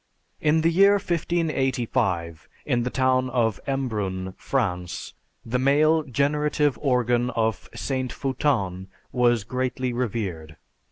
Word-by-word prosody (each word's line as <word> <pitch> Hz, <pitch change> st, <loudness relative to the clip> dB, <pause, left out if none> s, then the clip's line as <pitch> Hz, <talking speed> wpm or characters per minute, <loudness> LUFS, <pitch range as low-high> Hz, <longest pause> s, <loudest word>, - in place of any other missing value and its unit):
"In 155 Hz, +1 st, +3 dB
the 165 Hz, +1 st, +3 dB
year 195 Hz, +4 st, +6 dB
1585, 130 Hz, -, -1 dB, 0.2 s
in 125 Hz, -4 st, +1 dB
the 125 Hz, -, -1 dB
town 130 Hz, 0 st, +1 dB
of 115 Hz, -5 st, +1 dB
Embrun, 105 Hz, -9 st, -2 dB
France, 90 Hz, -10 st, -2 dB, 0.3 s
the 125 Hz, +2 st, -1 dB
male 150 Hz, +4 st, +4 dB
generative 145 Hz, +1 st, +1 dB
organ 125 Hz, -3 st, +2 dB
of 110 Hz, -2 st, -1 dB
St. 130 Hz, -2 st, -2 dB
Foutin 115 Hz, -9 st, -1 dB, 0.2 s
was 120 Hz, -3 st, +2 dB
greatly 125 Hz, +1 st, -2 dB
revered. 95 Hz, -10 st, -3 dB
125 Hz, 110 wpm, -25 LUFS, 110-140 Hz, 0.3 s, year